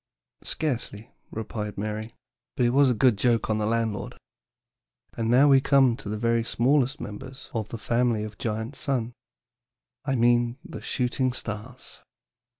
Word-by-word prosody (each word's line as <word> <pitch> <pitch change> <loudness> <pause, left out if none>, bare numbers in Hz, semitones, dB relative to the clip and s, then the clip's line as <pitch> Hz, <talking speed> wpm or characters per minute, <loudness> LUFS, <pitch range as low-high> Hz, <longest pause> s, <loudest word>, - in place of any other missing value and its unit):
"Scarcely," 120 -7 -3 0.2
replied 105 -2 -5
Mary; 110 +2 -4 0.4
"but 125 - +3
it 120 - +3
was 140 +1 +5
a 125 - +2
good 120 -3 +3
joke 115 -2 +2
on 110 - +1
the 105 - 0
landlord. 115 -2 -1 1.0
And 115 -1 -2
now 130 +5 +6
we 135 -2 +6
come 135 -4 +4
to 120 -6 -7
the 105 - -2
very 115 +1 +1
smallest 130 +3 +2
members 130 +6 -8
of 110 -2 -3
the 115 - -5
family 115 -1 +1
of 105 -1 -8
Giant 110 +4 -3
Sun. 125 -4 -1 0.9
I 135 -1 0
mean 120 0 +3
the - - -8
shooting 125 0 0
stars." 115 +2 -7
120 Hz, 150 wpm, -26 LUFS, 110-130 Hz, 1.0 s, now